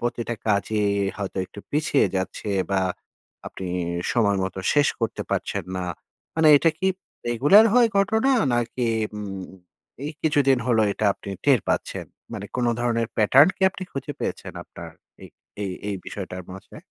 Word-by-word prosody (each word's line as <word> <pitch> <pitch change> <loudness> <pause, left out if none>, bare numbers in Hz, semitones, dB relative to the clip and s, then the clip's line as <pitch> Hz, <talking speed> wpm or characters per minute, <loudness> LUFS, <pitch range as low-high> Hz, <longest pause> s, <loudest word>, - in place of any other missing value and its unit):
প্রতিটা 120 0 -2
কাজই 105 +1 +1 0.3
হয়তো 100 -1 -4
একটু 100 - -11
পিছিয়ে 145 -1 +2
যাচ্ছে 95 +3 -4 0.2
বা 95 -1 +2 0.7
আপনি 95 - -6 0.5
সময় 105 -5 +2
মত 95 - -4 0.2
শেষ 145 0 +4
করতে 115 -1 -2
পারছেন - - -2
না। 90 - -2 0.5
মানে 160 -1 +4
এটা 165 +3 +4
কি 190 - 0 0.4
রেগুলার 145 - +6
হয় 240 -2 +6
ঘটনা? 220 +6 +3 0.2
নাকি 120 +1 -1 0.3
উম 100 -2 -5 0.6
এই 155 - -4
কিছুদিন 140 -4 +3
হলো 115 -3 +3
এটা 110 - -3
আপনি 100 - -9
টের 135 -5 +5
পাচ্ছেন? - - -2 0.3
মানে 105 -2 -5
কোন 125 - +1
ধরনের 115 -1 0
প্যাটার্ন 130 - +6
কি - - -6
আপনি 190 - -8
খুঁজে 135 - -4
পেয়েছেন - - -4
আপনার - - -10 0.3
এ - - -8 0.4
এ - - -1 0.2
এই 100 - -2
বিষয়টার 95 -2 -6
মাঝে? 95 - -12
120 Hz, 155 wpm, -24 LUFS, 100-145 Hz, 0.7 s, রেগুলার